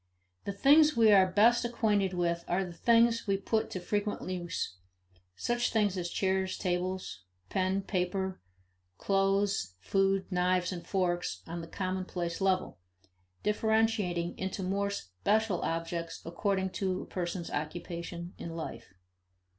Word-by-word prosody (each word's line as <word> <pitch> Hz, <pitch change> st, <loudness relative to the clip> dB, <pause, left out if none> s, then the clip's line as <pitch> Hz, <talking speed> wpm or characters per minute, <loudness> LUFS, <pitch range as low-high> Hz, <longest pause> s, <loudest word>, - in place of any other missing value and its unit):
The -, -, -1 dB
things 290 Hz, +7 st, +5 dB
we 225 Hz, -2 st, +6 dB
are 190 Hz, -2 st, +6 dB
best 230 Hz, +6 st, +5 dB
acquainted 210 Hz, -5 st, +1 dB
with 170 Hz, -1 st, 0 dB
are 190 Hz, +2 st, +1 dB
the 175 Hz, -, -8 dB
things 230 Hz, +5 st, +3 dB
we 195 Hz, -1 st, +2 dB
put 220 Hz, +3 st, 0 dB
to 185 Hz, -, -4 dB
frequent 205 Hz, +3 st, -2 dB
use 175 Hz, -, -3 dB, 0.6 s
such 240 Hz, -, 0 dB
things 205 Hz, -4 st, +2 dB
as 175 Hz, -2 st, -2 dB
chairs, 190 Hz, 0 st, 0 dB
tables, 180 Hz, -, -2 dB, 0.3 s
pen, 190 Hz, +1 st, 0 dB
paper, 190 Hz, 0 st, -2 dB, 0.6 s
clothes, 195 Hz, -, +1 dB
food, 195 Hz, -, +1 dB
knives 180 Hz, 0 st, +2 dB
and 175 Hz, -2 st, -6 dB
forks 180 Hz, -2 st, -1 dB
on 170 Hz, +1 st, -5 dB
the 165 Hz, -, -8 dB
commonplace 185 Hz, -1 st, -3 dB
level, 190 Hz, -, +1 dB, 0.6 s
differentiating 210 Hz, -5 st, +1 dB
into 190 Hz, +1 st, -3 dB
more 200 Hz, +2 st, 0 dB
special 200 Hz, -, 0 dB
objects 165 Hz, 0 st, -3 dB
according 190 Hz, +2 st, -1 dB
to 185 Hz, -1 st, -2 dB
a -, -, -10 dB
person's 175 Hz, -1 st, -4 dB
occupations 170 Hz, +3 st, -5 dB
in 165 Hz, -1 st, -6 dB
life. 160 Hz, -, -7 dB
190 Hz, 130 wpm, -31 LUFS, 175-200 Hz, 0.6 s, we